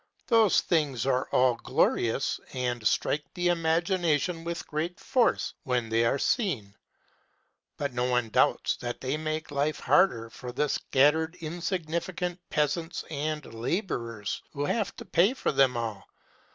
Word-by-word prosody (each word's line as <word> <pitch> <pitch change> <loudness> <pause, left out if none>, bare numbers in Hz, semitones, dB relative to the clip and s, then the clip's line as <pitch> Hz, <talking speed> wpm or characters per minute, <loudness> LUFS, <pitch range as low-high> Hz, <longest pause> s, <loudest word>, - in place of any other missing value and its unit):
Those 225 -5 +4
things 145 -9 0
are 130 -1 +1
all 125 -1 +4
glorious, 115 +2 +1
and 120 -4 -1
strike 150 +6 +1
the 175 0 +1
imagination 170 -1 +1
with 170 0 -4
great 160 +4 -3
force 250 -3 +1
when 125 -3 -1
they 115 +1 +2
are 115 - +2
seen; 135 - 0 1.0
but 140 -3 -2
no 120 0 0
one 125 -2 +1
doubts - - +2
that 120 0 -5
they 135 +2 -2
make 155 0 -3
life 145 +2 0
harder 120 -5 +3
for 125 - -7
the 150 +4 0
scattered 160 +7 +2
insignificant 175 +1 -3
peasants 160 +3 -1
and 150 -2 -3
laborers 115 - -3
who 145 -1 -2
have 205 +5 0
to - - -9
pay 195 +9 +3
for - - 0
them 135 -3 +3
all. 110 -4 -4
150 Hz, 140 wpm, -28 LUFS, 125-170 Hz, 1.0 s, Those